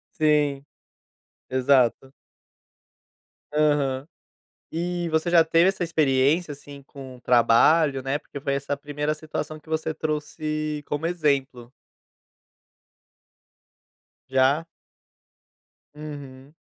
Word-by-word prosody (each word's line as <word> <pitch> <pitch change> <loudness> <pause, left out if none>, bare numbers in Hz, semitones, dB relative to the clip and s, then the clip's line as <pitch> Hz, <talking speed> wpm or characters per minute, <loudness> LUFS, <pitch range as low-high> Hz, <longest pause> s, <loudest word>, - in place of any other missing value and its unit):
Sim. 150 -3 +2 0.8
Exato. 130 0 +2 1.4
Aham. 145 -3 +1 0.7
E 175 +1 -2
você 160 +2 0
já 170 -2 +6
teve 165 +2 +3
essa 190 -2 -2
experiência, 150 0 +2
assim, 140 0 -12
com 135 -2 -11
trabalho, 130 +5 +4
né, 135 +2 -1
porque 150 -1 -10
foi 140 0 -2
essa 140 +1 -2
primeira 145 +1 -3
situação 155 0 -6
que 155 - -20
você 160 0 -1
trouxe 155 0 -3
como 145 +2 -3
exemplo. 140 -8 -1 2.6
Já? 135 +4 +3 1.3
Uhum. 145 -2 -10
145 Hz, 90 wpm, -24 LUFS, 135-155 Hz, 2.6 s, já